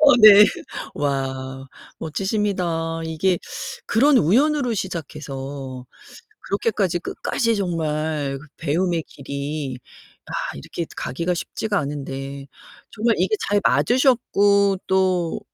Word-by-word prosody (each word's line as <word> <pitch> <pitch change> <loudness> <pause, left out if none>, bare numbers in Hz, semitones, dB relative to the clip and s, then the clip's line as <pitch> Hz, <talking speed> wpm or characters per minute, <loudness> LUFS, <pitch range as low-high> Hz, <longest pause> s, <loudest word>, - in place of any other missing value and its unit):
어 285 -4 +8
네. 210 -1 +11 0.5
와 135 -1 -3 0.3
멋지십니다. 175 -3 -1
이게 160 +3 +1 0.5
그런 275 +6 +4
우연으로 255 - +3
시작해서 140 -7 -5 0.6
그렇게까지 200 -3 0
끝까지 230 +6 -1
정말 155 -6 -1
그 150 - -14
배움의 165 +2 0
길이 140 -1 -5 0.5
아 - - -11 0.2
이렇게 165 - -5
가기가 170 +7 -2
쉽지가 210 +4 -2
않은데 140 -1 -5 0.4
정말 230 +1 +1
이게 190 +4 +2
잘 205 0 +2
맞으셨고 200 - +3
또 185 -3 +1
170 Hz, 230 characters per minute, -22 LUFS, 140-200 Hz, 0.6 s, 네